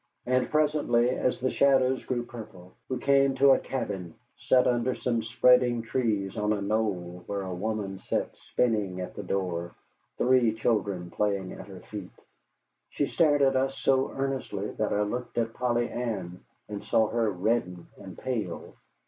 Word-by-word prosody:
And 130 +1 +1
presently, 145 -6 +2
as 125 -1 0
the 130 +1 0
shadows 130 -2 +3
grew 120 -2 -2
purple, 105 -7 -11 0.2
we 130 - -1
came 135 +1 +3
to 135 +1 +6
a - - +5
cabin 95 -10 -4 0.2
set 125 -1 +3
under 125 +1 +1
some 115 -2 -1
spreading 120 +1 +4
trees 110 -5 -1
on 105 0 +1
a 105 - -2
knoll 100 -4 -2
where 100 -1 -3
a 95 -1 -4
woman 100 0 -3
sat - - -2
spinning 105 -6 -1
at 90 - -5
the - - -6
door, 90 -3 -3 0.4
three 125 -3 +3
children 100 -6 -1
playing 100 -3 -1
at - - -10
her 95 -2 -10
feet. 100 -4 -8 0.8
She 145 - 0
stared 145 -2 +3
at 135 0 +4
us 135 +1 0
so 135 0 +2
earnestly 135 -7 -3
that 110 - -2
I 105 - +1
looked 120 +5 -4
at 115 -1 0
Polly 120 -1 0
Ann, 95 -7 -4 0.2
and 105 -1 -6
saw 110 -1 +3
her 115 -2 +1
redden 90 -2 -1
and 95 -2 -10
pale. 125 -5 -4
115 Hz, 165 wpm, -28 LUFS, 100-130 Hz, 0.8 s, to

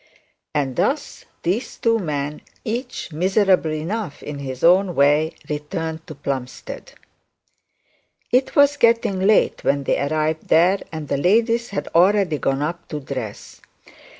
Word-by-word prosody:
And 135 -3 -1
thus 275 - -1 0.2
these 195 +9 -2
two 230 -1 +2
men, 150 -4 -3 0.2
each 240 - -4
miserable 185 0 +2
enough 165 +2 -4
in 145 -1 -6
his 130 -2 -6
own 180 +1 +4
way, 145 +3 +3
returned 160 +2 -4
to 155 - -8
Plumstead. 135 -2 -6 1.4
It 255 +2 +2
was 285 -1 +5
getting 230 -6 +3
late 200 +3 +3
when 140 0 +1
they - - 0
arrived 155 +2 -1
there, 180 +5 +4
and 155 -2 -6
the 140 - 0
ladies 230 - +2
had 200 - -4
already 180 -3 +3
gone 135 +1 0
up 170 +3 -4
to 150 - -4
dress. 130 -7 -7
165 Hz, 135 wpm, -21 LUFS, 145-205 Hz, 1.4 s, was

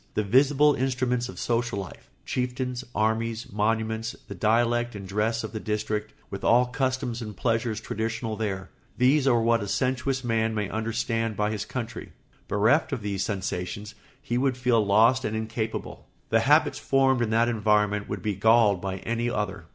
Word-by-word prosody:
The 105 - +1
visible 140 +7 +4
instruments 125 -2 -1
of - - -9
social 120 -2 -1
life—chieftains, 125 +6 -4
armies, 110 +1 -1
monuments, 110 +1 -1
the - - -6
dialect 120 +1 +1
and 100 -1 -7
dress 110 +4 0
of 110 - -5
the 110 - -4
district, 105 0 -3 0.2
with 100 - -6
all 125 +2 +5
customs 125 -2 -2
and 105 -4 -7
pleasures 115 -2 0
traditional 115 0 -3
there—these 110 - -1
are 120 -3 +4
what 115 -1 +3
a 100 - -4
sensuous 130 +3 -1
man 110 -2 0
may 105 -2 -1
understand 115 0 -2
by 105 0 +1
his 105 -1 -3
country. 115 -1 -6 0.3
Bereft 115 +11 +2
of 125 -7 -3
these 100 -2 -2
sensations 100 +1 -4 0.3
he 120 +1 -2
would 130 -1 +1
feel 125 -3 +2
lost 115 +6 +4
and 110 - -2
incapable; 110 0 -4 0.2
the - - +4
habits - - +3
formed 135 -2 +2
in 115 - +1
that 115 +1 +3
environment 105 -2 +1
would - - -4
be 105 - 0
galled 105 -1 +4
by 95 -1 -3
any 115 +1 -1
other. 105 -5 -3
115 Hz, 165 wpm, -26 LUFS, 105-125 Hz, 0.3 s, all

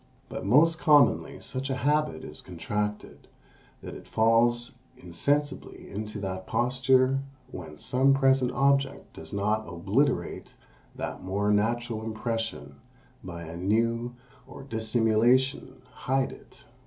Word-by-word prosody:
But - - -5
most 160 +8 +5
commonly 145 -5 +4
such 130 +2 -3
a 135 - 0
habit 145 - 0
is 75 - -9
contracted, 105 +4 -4 0.6
that - - -7
it - - -11
falls 115 +2 +3 0.3
insensibly 140 - -2
into 105 +1 -5
that 95 -1 -5
posture 130 +2 +2 0.3
when 80 -4 -9
some 130 - +2
present 135 -2 +3
object 140 +1 +1
does - - -8
not 105 +2 -1
obliterate 100 +11 -1 0.4
that - - -5
more 100 +2 0
natural 115 +2 0
impression 110 - -4 0.5
by 85 -2 -7
a 80 0 -8
new, 115 +6 0 0.3
or - - -11
dissimulation 115 +2 +1
hide 135 0 -1
it. - - -15
115 Hz, 115 wpm, -27 LUFS, 105-130 Hz, 0.6 s, most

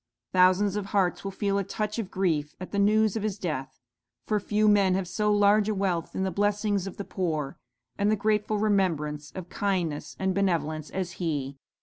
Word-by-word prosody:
Thousands 185 +2 +4
of 205 -2 -3
hearts 190 -4 +1
will 195 - -3
feel 200 +1 0
a - - 0
touch 215 +3 -3
of 205 -5 -3
grief 155 -6 -1
at 185 - -7
the 200 - -1
news 215 +1 +3
of 220 - -1
his 210 -1 -2
death; 155 -9 -4 0.5
for 210 -1 +1
few 210 +2 +1
men 200 -3 +4
have 190 -1 -1
so 210 +4 0
large 205 +1 +4
a 215 - 0
wealth 185 -4 -1
in 190 - 0
the 190 - -1
blessings 205 0 0
of 195 - -8
the 200 - -5
poor, 155 -7 -3 0.4
and 205 +1 +3
the 215 - +3
grateful 210 0 +1
remembrance 165 -8 0
of 185 -2 -6
kindness 180 -7 -2
and 190 0 0
benevolence, 160 -5 0
as 185 -2 -3
he.' 140 -5 -2
195 Hz, 200 wpm, -27 LUFS, 175-205 Hz, 0.5 s, Thousands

